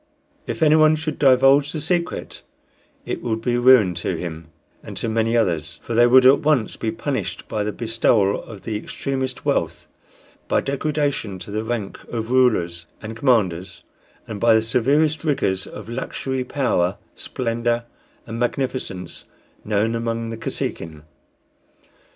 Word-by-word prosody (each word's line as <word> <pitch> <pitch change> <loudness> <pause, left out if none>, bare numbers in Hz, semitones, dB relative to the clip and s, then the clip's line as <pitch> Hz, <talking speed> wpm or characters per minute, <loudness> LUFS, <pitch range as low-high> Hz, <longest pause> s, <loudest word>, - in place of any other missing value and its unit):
If - - -2
anyone 155 0 +5
should 155 -1 -4
divulge 135 +1 +5
the 160 - -4
secret, 170 +3 -2 0.6
it - - -4
would 110 -2 -2
be 120 +1 0
ruin 120 -7 +6
to 90 - -1
him 80 -1 -6 0.3
and - - -9
to - - -2
many 115 +1 +1
others; 80 -7 -1
for 120 - -5
they 120 +1 +5
would 130 +1 +6
at 130 +2 +7
once 150 -8 +1
be 110 - -3
punished 110 -9 -4
by 105 - -2
the 105 - -2
bestowal 110 -3 +1
of 105 -4 -11
the 110 - -3
extremest 130 +3 -4
wealth, - - -1 0.6
by - - +2
degradation 140 -7 -2
to 95 - -9
the 110 +1 -2
rank 110 -3 -4
of 115 0 -4
rulers 85 -10 +2
and 110 +1 -7
commanders, 105 -8 0 0.4
and 105 -2 -6
by 115 0 +5
the 110 - +3
severest 145 +7 +1
rigors 100 - 0
of 105 -1 -9
luxury, 130 +2 -3
power, 120 -9 0 0.2
splendor, 120 -1 -2 0.4
and 115 +1 -6
magnificence 120 -8 -3 0.4
known 105 +2 0
among 115 0 -2
the 115 - -5
Kosekin. 80 -7 -5
115 Hz, 145 wpm, -22 LUFS, 105-130 Hz, 0.6 s, at